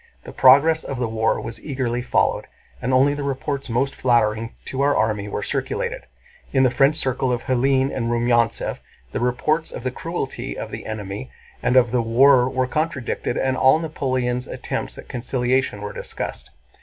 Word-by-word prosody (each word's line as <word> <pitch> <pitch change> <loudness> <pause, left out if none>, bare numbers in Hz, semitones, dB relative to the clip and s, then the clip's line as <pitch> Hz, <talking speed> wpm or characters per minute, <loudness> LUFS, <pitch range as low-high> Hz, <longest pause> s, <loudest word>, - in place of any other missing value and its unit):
The - - -10
progress 150 +5 +6
of 135 - -5
the 120 -1 -1
war 110 0 0
was 115 - -6
eagerly 130 -4 -2
followed, - - +1 0.3
and 125 - -1
only 135 +2 +4
the 145 - -4
reports 140 0 -3
most 130 +4 0
flattering 115 -2 +1
to 135 - -3
our 145 +1 +3
army 105 -2 0
were 105 - -3
circulated. 475 - -3 0.4
In 135 -1 +3
the 130 - +4
French 135 +3 +3
circle 130 -3 -1
of 120 -1 -2
Hélène 130 +1 +1
and 115 -3 -1
Rumyántsev 120 -1 +1 0.3
the - - -2
reports 140 +6 0
of - - -8
the 130 - -1
cruelty 165 0 -5
of - - -6
the - - -7
enemy 105 +2 -5 0.3
and 125 - +1
of 125 -3 +5
the 125 -1 +2
war 125 +2 +5
were 130 0 0
contradicted 145 -3 -2
and 130 0 +1
all 130 +3 +5
Napoleon's 130 -6 -2
attempts - - -4
at - - -10
conciliation 125 -2 -1
were 105 0 -5
discussed. - - -5
130 Hz, 175 wpm, -22 LUFS, 120-135 Hz, 0.4 s, progress